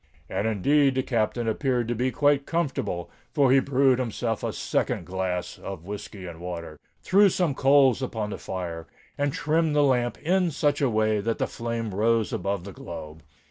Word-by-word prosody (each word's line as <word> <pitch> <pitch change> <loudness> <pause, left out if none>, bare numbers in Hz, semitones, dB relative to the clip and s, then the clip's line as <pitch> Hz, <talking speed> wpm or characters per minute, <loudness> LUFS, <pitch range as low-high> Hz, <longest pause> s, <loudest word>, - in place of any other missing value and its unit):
And 105 - -1
indeed 135 +6 +3
the 130 - +1
Captain 115 0 -1
appeared 125 0 0
to 120 - 0
be 125 +3 0
quite 145 +1 +2
comfortable; 140 - -2 0.2
for 140 -4 +4
he 135 - +6
brewed 135 -1 +3
himself 115 -2 -2
a - - -1
second - - -1
glass 90 -1 -3
of 95 -4 -7
whiskey 100 -1 -7
and 85 -2 -8
water—threw 90 - 0
some 175 -5 0
coals 135 -2 +4
upon 110 -5 -3
the - - -5
fire—and 90 - -5
trimmed 160 -1 +1
the 145 - +5
lamp 125 -3 +1
in 180 +2 +1
such 145 -1 0
a 140 - +3
way 110 -1 +2
that 115 +2 -1
the - - 0
flame 115 -3 -4
rose 110 +2 +1
above 100 -2 -2
the 100 - -8
globe. 80 -2 -9
120 Hz, 175 wpm, -26 LUFS, 100-140 Hz, 0.2 s, he